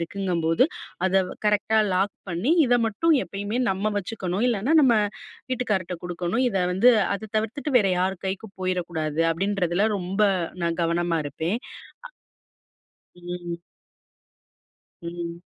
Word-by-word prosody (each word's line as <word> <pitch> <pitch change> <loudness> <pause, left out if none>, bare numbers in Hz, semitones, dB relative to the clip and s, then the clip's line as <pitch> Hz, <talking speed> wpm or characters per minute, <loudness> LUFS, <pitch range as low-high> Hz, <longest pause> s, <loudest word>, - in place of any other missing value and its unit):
இருக்குங்கும்போது, 170 - +1 0.4
அத 190 0 +3 0.2
கரெக்ட்டா 210 +1 +3
லாக் 195 +2 +1 0.2
பண்ணி 180 - +1
இதை 245 0 +4
மட்டும் 320 +10 +2
எப்பயுமே 205 +5 -3
நம்ம 200 +3 -1
வச்சுக்கணும். 195 0 -2
இல்லைன்னா, 235 +8 +1
நம்ம 250 -4 +5 0.6
வீட்டுக்காரர்கிட்ட 195 -9 -1
குடுக்கணும். 175 +7 -1
இதை 195 -4 0
வந்து, 215 +7 +5 0.3
அத 210 +1 -7
தவிர்த்துட்டு 265 +7 -3
வேற 200 - +2
யார் 185 0 0
கைக்கும் 195 +2 -5
போயிரக்கூடாது." 170 -4 -2
அப்படீன்றதுல 195 +2 0
ரொம்ப 190 +4 -1 0.4
நான் 170 +1 -1
கவனமா 170 0 0
இருப்பேன். 160 +5 -3 0.5
அ - - -9 1.1
ம். 175 -1 -6 1.4
ம். 170 0 -6
190 Hz, 115 wpm, -25 LUFS, 175-215 Hz, 1.4 s, நம்ம